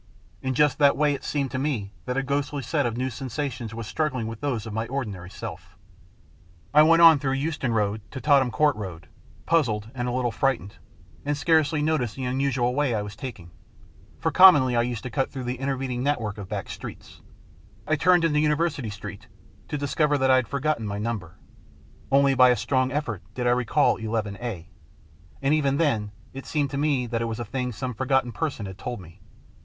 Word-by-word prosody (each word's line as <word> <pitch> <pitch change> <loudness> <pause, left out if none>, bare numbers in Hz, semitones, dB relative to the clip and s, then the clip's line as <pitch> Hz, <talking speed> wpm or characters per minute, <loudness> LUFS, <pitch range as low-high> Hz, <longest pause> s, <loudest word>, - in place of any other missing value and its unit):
In 130 -1 -2
just 150 +2 +3
that 140 -2 +5
way 150 0 +3
it 135 - -6
seemed 140 -3 -2
to 130 - -2
me 120 -9 -2
that 125 +1 -2
a 135 - +1
ghostly 140 0 -2
set 120 - 0
of 115 0 -4
new 130 +1 -1
sensations 130 -1 -4
was 115 -1 -5
struggling 130 -2 -1
with 115 0 -6
those 130 -7 -2
of 110 - -6
my 110 +1 -2
ordinary 105 -10 -4
self. - - -9 1.0
I 150 - +8
went 165 +2 +6
on 165 -3 +9
through 135 -1 -1
Euston 140 -2 -1
Road 105 -1 0
to 130 - -7
Tottenham 140 -3 +4
Court 145 +5 +2
Road, 90 -7 -7 0.4
puzzled, 115 -10 +1
and 125 -1 -3
a - - -1
little 125 -1 0
frightened, 115 -5 -1 0.5
and 145 0 -1
scarcely 155 0 +2
noticed 150 -8 0
the 135 - -5
unusual 125 -1 0
way 135 -3 +1
I 105 - -1
was 105 0 -8
taking, 105 -9 -8 0.7
for - - -1
commonly 145 -10 +7
I 120 - +4
used 120 -1 -3
to 130 - -5
cut 135 -2 0
through 130 -2 -5
the 125 0 -4
intervening 135 -2 -2
network 120 -7 -1
of 100 - -8
back - - -4
streets. - - -10 0.6
I 155 - +2
turned 175 +2 +4
into 150 -2 +2
University 150 -4 0
Street, 105 0 -8 0.4
to 150 - -3
discover 145 +1 +1
that 130 -1 +3
I 130 - +6
had 130 -3 0
forgotten 140 -3 -1
my 100 0 -3
number. 105 -6 -4 0.8
Only 140 0 +5
by 130 -1 +6
a 125 - +4
strong 130 +3 0
effort 135 - -2
did 125 - -2
I 120 - +4
recall 125 +4 +2
IIA, 110 -3 -3 0.8
and 140 +2 +3
even 140 -3 +2
then 115 -10 +1 0.2
it 135 0 -8
seemed 145 -3 -1
to 140 - -3
me 145 -4 +1
that 115 -1 -2
it - - 0
was 115 0 -4
a 120 - -3
thing 125 +3 -3
some 125 +3 -4
forgotten 130 +1 +1
person 140 -7 -3
had 95 -1 -8
told 120 -2 -5
me. 85 -3 -14
130 Hz, 200 wpm, -25 LUFS, 115-145 Hz, 1.0 s, on